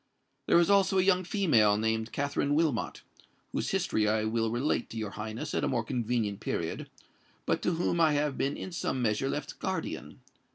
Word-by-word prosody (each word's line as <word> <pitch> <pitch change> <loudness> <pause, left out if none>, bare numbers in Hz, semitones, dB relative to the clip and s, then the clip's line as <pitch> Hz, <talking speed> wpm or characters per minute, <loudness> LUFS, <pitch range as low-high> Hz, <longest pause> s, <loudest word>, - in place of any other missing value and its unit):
There - - +5
is 175 +3 +4
also 195 -1 +4
a 185 - +4
young 185 -1 +3
female 135 - +3
named 110 +1 -1
Katherine 145 0 0
Wilmot,—whose 155 -7 -3
history 105 -1 +1
I 110 0 +2
will 115 0 0
relate 120 +6 0
to 115 - -7
your 110 -2 -3
Highness 110 +2 -5
at - - 0
a - - +2
more 115 - 0
convenient 115 -4 -1
period,—but 85 -5 -5
to 180 - +1
whom 170 0 0
I 160 -2 +5
have 145 -1 0
been 140 +1 -1
in 190 - -6
some 170 -6 -2
measure 110 +4 +1
left 145 - -4
guardian. - - -4
125 Hz, 175 wpm, -29 LUFS, 110-165 Hz, -, There